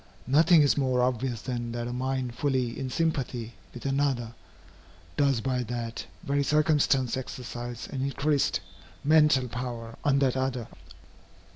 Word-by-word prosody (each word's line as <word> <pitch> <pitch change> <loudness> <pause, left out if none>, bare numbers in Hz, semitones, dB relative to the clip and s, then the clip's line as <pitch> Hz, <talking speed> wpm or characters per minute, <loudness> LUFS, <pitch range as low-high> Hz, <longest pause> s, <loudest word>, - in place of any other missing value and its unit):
Nothing 155 +4 +6
is 145 - +3
more 130 -2 +2
obvious 125 -2 -1
than 120 -2 -3
that 120 0 -3
a 120 - -4
mind 130 -1 -2
fully 130 -3 -1
in 135 -1 -3
sympathy 125 -6 -1 0.2
with 120 - -10
another, 135 -4 0 0.8
does 140 -5 +2
by 125 +1 0
that 120 -1 -4 0.2
very 140 0 +1
circumstance 145 -4 +2
exercise 120 -2 -6
an 135 - -3
increased 140 -2 +1 0.4
mental 150 -3 +5
power 120 -2 -5
on 140 -1 +3
that 135 -2 +2
other. 130 -3 -1
130 Hz, 135 wpm, -28 LUFS, 120-140 Hz, 0.8 s, Nothing